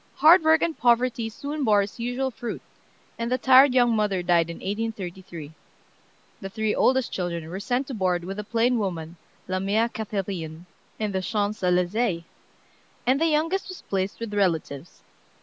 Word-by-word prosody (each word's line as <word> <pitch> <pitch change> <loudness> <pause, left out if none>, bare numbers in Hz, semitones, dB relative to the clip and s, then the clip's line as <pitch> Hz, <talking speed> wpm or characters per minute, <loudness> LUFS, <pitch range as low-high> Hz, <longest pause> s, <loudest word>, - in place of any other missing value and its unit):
Hard 330 +4 +7
work 320 0 +4
and 335 -2 0
poverty 240 -1 +2
soon 285 +6 -5
bore 210 -4 +4
its 200 +4 -9
usual 245 +3 -2
fruit, 240 0 -6 0.6
and 230 +1 -2
the 255 - +2
tired 260 0 +6
young 240 -2 +4
mother 205 -4 0
died 170 -2 +2
in 170 - -5
1833. 190 -7 -5 0.9
The 195 - -5
three 220 +1 -1
oldest 260 -1 +2
children 170 -3 -3
were 180 +4 -6
sent 245 +6 -1
to 265 - -7
board 185 -5 0
with 195 +3 -6
a - - -3
plain 235 +3 +1
woman, 170 -4 -4 0.3
"La 185 0 -1
mère 215 +5 +1
Cathérine," 185 -6 -4 0.3
in 215 -1 -2
the 190 -1 -1
Champs 210 +2 -2
Elysées, 180 +1 +1 0.8
and 260 +4 +2
the 330 - +4
youngest 330 +6 0
was 370 - -9
placed 190 0 -2
with 230 -2 -5
relatives. 170 -6 -2
210 Hz, 165 wpm, -25 LUFS, 185-245 Hz, 0.9 s, Hard